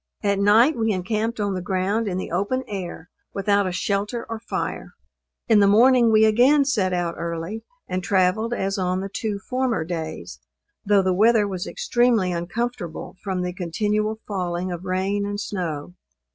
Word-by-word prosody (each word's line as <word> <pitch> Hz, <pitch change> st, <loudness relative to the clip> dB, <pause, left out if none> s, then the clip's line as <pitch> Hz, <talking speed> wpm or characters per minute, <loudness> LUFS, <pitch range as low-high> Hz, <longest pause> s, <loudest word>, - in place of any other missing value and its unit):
At 200 Hz, -1 st, +1 dB
night 225 Hz, +9 st, +5 dB
we 225 Hz, -1 st, 0 dB
encamped 215 Hz, +4 st, -2 dB
on 205 Hz, -1 st, 0 dB
the 185 Hz, -, -3 dB
ground 195 Hz, +4 st, -1 dB
in 185 Hz, -2 st, -2 dB
the 185 Hz, -, -5 dB
open 200 Hz, +9 st, -1 dB
air, 180 Hz, -4 st, -6 dB, 0.2 s
without 200 Hz, 0 st, +2 dB
a -, -, -2 dB
shelter 200 Hz, +5 st, -2 dB
or 225 Hz, -1 st, -5 dB
fire. 230 Hz, -, -4 dB, 0.5 s
In 220 Hz, -4 st, +5 dB
the 200 Hz, -, +5 dB
morning 235 Hz, +3 st, +5 dB
we 220 Hz, 0 st, +6 dB
again 255 Hz, +7 st, +4 dB
set 210 Hz, -9 st, +1 dB
out 175 Hz, -2 st, -1 dB
early, 170 Hz, +6 st, -4 dB, 0.2 s
and 185 Hz, 0 st, -3 dB
travelled 195 Hz, +4 st, +1 dB
as 195 Hz, -4 st, -1 dB
on 185 Hz, 0 st, 0 dB
the 195 Hz, -, -5 dB
two 215 Hz, -3 st, -2 dB
former 250 Hz, -2 st, -1 dB
days, 160 Hz, -1 st, -6 dB, 0.4 s
though 205 Hz, -2 st, +3 dB
the 185 Hz, 0 st, +2 dB
weather 215 Hz, +2 st, +4 dB
was 185 Hz, -3 st, -4 dB
extremely 240 Hz, -6 st, +1 dB
uncomfortable, 175 Hz, +1 st, -4 dB
from 190 Hz, -3 st, -2 dB
the 180 Hz, 0 st, -3 dB
continual 210 Hz, +4 st, -1 dB
falling 180 Hz, -2 st, -2 dB
of 175 Hz, +1 st, -6 dB
rain 190 Hz, +2 st, -1 dB
and 205 Hz, 0 st, -3 dB
snow. 175 Hz, -6 st, -4 dB
200 Hz, 170 wpm, -23 LUFS, 180-220 Hz, 0.5 s, we